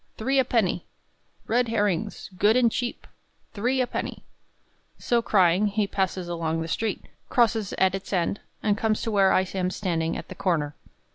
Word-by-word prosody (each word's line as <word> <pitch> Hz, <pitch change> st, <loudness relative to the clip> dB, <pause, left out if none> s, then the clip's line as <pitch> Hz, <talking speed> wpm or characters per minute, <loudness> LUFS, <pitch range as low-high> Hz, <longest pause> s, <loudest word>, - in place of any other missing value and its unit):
three 265 Hz, +5 st, +1 dB
a -, -, +5 dB
penny! 220 Hz, -8 st, 0 dB, 0.6 s
Red 245 Hz, +2 st, +2 dB
herrings, 205 Hz, -3 st, -1 dB
good 210 Hz, +5 st, +4 dB
and 240 Hz, -2 st, +4 dB
cheap, 240 Hz, +1 st, -3 dB, 0.5 s
three 245 Hz, +6 st, 0 dB
a -, -, +2 dB
penny!" -, -, -5 dB, 0.7 s
So 240 Hz, -1 st, +1 dB
crying, 190 Hz, -2 st, +3 dB
he 205 Hz, +1 st, 0 dB
passes 190 Hz, -2 st, -2 dB
along 165 Hz, -1 st, -2 dB
the 165 Hz, -, -3 dB
street, 215 Hz, +5 st, -2 dB, 0.3 s
crosses 225 Hz, -4 st, +2 dB
at 190 Hz, -1 st, +2 dB
its 195 Hz, 0 st, -5 dB
end, 185 Hz, +1 st, 0 dB, 0.2 s
and 210 Hz, -2 st, +2 dB
comes 215 Hz, 0 st, 0 dB
to 225 Hz, -, -1 dB
where 195 Hz, -2 st, +4 dB
I 185 Hz, -, +3 dB
am 185 Hz, -1 st, 0 dB
standing 165 Hz, -4 st, -1 dB
at -, -, -8 dB
the -, -, -8 dB
corner. 170 Hz, -6 st, -1 dB
200 Hz, 170 wpm, -26 LUFS, 180-225 Hz, 0.7 s, a